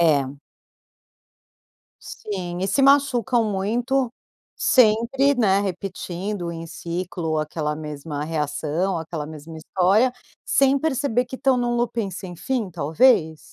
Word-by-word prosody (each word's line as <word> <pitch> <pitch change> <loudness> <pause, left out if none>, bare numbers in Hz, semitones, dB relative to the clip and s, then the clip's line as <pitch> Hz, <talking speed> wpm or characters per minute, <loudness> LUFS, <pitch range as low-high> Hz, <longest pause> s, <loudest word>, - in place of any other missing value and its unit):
É. 145 -4 +2 1.6
Sim 180 -4 -6
e 190 - 0
se 275 - +2
machucam 265 -3 +4
muito, 235 +6 0 0.4
sempre, 250 +4 +3
né, 200 -6 +3
repetindo 190 -1 -4
em 165 0 -7
ciclo 170 -1 -3
aquela 155 0 -2
mesma 150 -1 -6
reação, 160 +3 -1
aquela 160 -2 -5
mesma 160 +1 -10
história, 190 +9 +2 0.3
sem 275 0 +3
perceber 265 -5 0
que 250 +1 -8
estão 265 0 +2
num 240 -1 0
looping 235 -3 -1
sem 180 -1 -8
fim, 240 0 -2
talvez? 160 - +3
190 Hz, 115 wpm, -23 LUFS, 160-245 Hz, 1.6 s, machucam